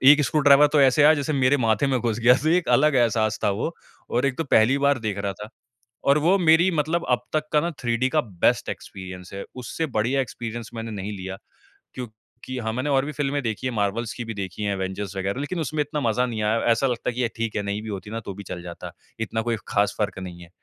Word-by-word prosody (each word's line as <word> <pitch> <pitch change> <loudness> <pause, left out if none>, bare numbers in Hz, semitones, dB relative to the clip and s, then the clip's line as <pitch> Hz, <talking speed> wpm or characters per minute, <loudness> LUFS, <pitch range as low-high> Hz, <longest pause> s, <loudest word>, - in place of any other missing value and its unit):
1 150 0 +3
screw 150 +4 +1
driver 145 +1 +7
तो 150 - +5
ऐसे 135 +2 +5
आया 155 +2 +7
जैसे 145 +1 -2
मेरे 135 0 +3
माथे 110 +5 +2
में 130 -2 +1
घुस 115 -1 -1
गया 120 +2 +6
तो 155 - +1
एक 175 +1 +2
अलग 150 +1 +4
एहसास 110 -2 +2
था - - +3
वो। 115 +12 -2 0.4
और 125 +3 +1
एक 130 -2 -1
तो 165 - 0
पहली 130 0 +4
बार 140 -1 +3
देख 105 -3 -3
रहा 100 -1 -2
था। 105 +2 -9 0.6
और 145 - +5
वो 175 +6 +4
मेरी 170 +1 +5
मतलब 160 +1 0
अब 125 - +3
तक 155 -1 +1
का 150 - +4
ना 170 - -1
3D 120 +1 +1
का 155 - +4
बेस्ट 100 - 0
एक्सपीरियंस 95 -1 -8
है। 100 - -5
उससे 130 +6 -3
बढ़िया 125 +6 +2
एक्सपीरियंस 115 -2 -5
मैंने 115 0 -5
नहीं 105 0 -5
लिया 95 0 -6 0.6
क्योंकि 120 +1 -9
हाँ, 110 -1 -2
मैंने 130 +4 -2
और 135 -1 +2
भी 150 - -4
फ़िल्में 145 0 -1
देखी 115 +3 -2
हैं 125 - -3
मार्वल्स 105 +3 -1
की 120 - -6
भी 115 - -5
देखी 100 0 -5
हैं 100 -1 0
एवेंजर्स 95 +1 -4
वग़ैरह। 100 +5 -2
लेकिन 170 +4 -3
उसमें 155 0 -1
इतना 150 +1 -4
मज़ा 125 +3 +1
नहीं 115 -3 -3
आया। 110 +2 +1
ऐसा 125 +4 +2
लगता 125 0 -1
है - - -3
कि 125 - -1
ये 120 - +2
ठीक 115 -1 -2
है 105 - 0
नहीं 100 +1 -3
भी 110 - -7
होती 100 0 -6
ना 115 - -3
तो 100 - -5
भी 100 +1 -9
चल 90 -1 -7
जाता। 85 -1 -8 0.3
इतना 115 0 -2
कोई 115 0 -1
ख़ास 100 0 +1
फ़र्क 105 -2 -2
नहीं 90 -2 -8
है। 85 - -13
120 Hz, 255 wpm, -24 LUFS, 105-140 Hz, 0.6 s, driver